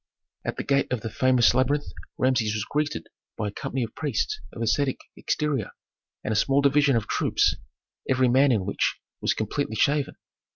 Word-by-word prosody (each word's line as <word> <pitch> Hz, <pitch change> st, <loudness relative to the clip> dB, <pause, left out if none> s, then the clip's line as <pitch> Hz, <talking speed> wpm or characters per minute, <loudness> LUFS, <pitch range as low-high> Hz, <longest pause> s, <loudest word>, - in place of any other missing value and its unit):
At -, -, -4 dB
the -, -, -2 dB
gate 140 Hz, -2 st, +1 dB
of 125 Hz, -4 st, -1 dB
the 115 Hz, -, -5 dB
famous 130 Hz, -1 st, +4 dB
labyrinth 140 Hz, +3 st, +1 dB, 0.3 s
Rameses 120 Hz, -5 st, +1 dB
was 105 Hz, -1 st, -2 dB
greeted 150 Hz, +3 st, -2 dB, 0.3 s
by 105 Hz, -2 st, -1 dB
a -, -, -8 dB
company 125 Hz, +5 st, -3 dB
of 115 Hz, -, -6 dB
priests 145 Hz, -7 st, -2 dB
of 115 Hz, -, -5 dB
ascetic 130 Hz, +4 st, +1 dB, 0.2 s
exterior, 145 Hz, -8 st, -1 dB, 0.5 s
and -, -, -2 dB
a -, -, 0 dB
small 135 Hz, +6 st, +3 dB
division 140 Hz, -1 st, +4 dB
of 115 Hz, -, 0 dB
troops, -, -, +2 dB, 0.5 s
every 130 Hz, -1 st, +3 dB
man 130 Hz, +3 st, +4 dB
in 105 Hz, -6 st, +1 dB
which 100 Hz, -, 0 dB, 0.2 s
was -, -, +1 dB
completely 110 Hz, +2 st, -2 dB
shaven. 140 Hz, +5 st, +1 dB
130 Hz, 175 wpm, -25 LUFS, 110-140 Hz, 0.5 s, famous